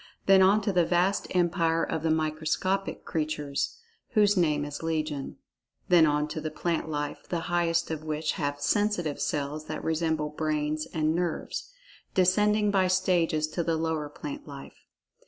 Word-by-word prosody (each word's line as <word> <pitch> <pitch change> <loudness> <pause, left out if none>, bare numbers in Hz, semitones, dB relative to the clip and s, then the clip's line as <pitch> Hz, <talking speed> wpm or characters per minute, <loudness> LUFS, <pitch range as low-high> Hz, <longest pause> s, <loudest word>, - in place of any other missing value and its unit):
Then 195 -1 +6
on 200 +3 +5
to 200 -1 -1
the 175 -1 +4
vast 180 +4 +1
empire 165 -2 +1
of 160 - -2
the 160 - 0
microscopic 160 +5 -1
creatures, 150 -3 -2 0.4
whose 210 -2 +4
name 150 -5 +2
is 145 -1 -6
legion. 155 -3 -3 0.5
Then 170 -3 +6
on 150 0 +1
to 155 0 -4
the 155 - -3
plant 160 +1 -2
life, 145 -1 -4
the 170 -2 -1
highest 170 0 0
of 155 -1 -4
which 155 0 -1
have 145 -1 -2
"sensitive 175 -1 0
cells" 150 +1 -2
that - - -5
resemble 160 -1 0
brains 155 0 -2
and 155 -1 0
nerves—descending 210 - 0
by 190 -2 +3
stages 180 -4 +2
to 170 - -2
the 165 0 0
lower 160 -2 -2
plant 150 0 -7
life. 140 -1 -11
160 Hz, 155 wpm, -28 LUFS, 155-180 Hz, 0.5 s, Then